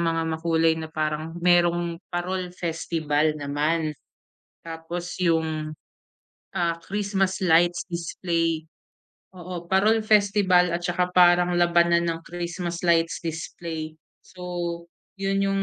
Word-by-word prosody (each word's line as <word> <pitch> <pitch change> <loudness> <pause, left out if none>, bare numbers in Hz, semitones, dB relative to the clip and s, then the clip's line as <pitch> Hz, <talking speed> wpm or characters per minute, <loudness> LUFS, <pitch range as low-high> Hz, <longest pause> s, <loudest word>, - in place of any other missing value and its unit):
mga 165 -1 +1
makulay 160 0 +2
na 160 - -5
parang, 155 +1 -3
mayro'ng 175 -1 +3
Parol 180 +1 -3
Festival 155 -3 -1
naman. 150 +2 -1 0.7
Tapos, 170 +2 -6
'yong, 160 -3 0 0.8
ah, 170 -2 0
Christmas 195 -1 -1
lights 175 0 +4
display, 165 -1 -1 0.7
oo, 180 -1 -7
Parol 215 +4 +3
Festival 200 -4 +3
at 175 - -2
saka 180 +1 0
parang 175 0 +5
labanan 170 0 +3
ng 165 0 -4
Christmas 175 0 -4
lights 165 -1 +2
display. 160 -1 -5 0.3
So, 175 -2 -5 0.3
'yon 195 0 0
'yong 195 0 0
170 Hz, 110 wpm, -25 LUFS, 165-180 Hz, 0.8 s, parang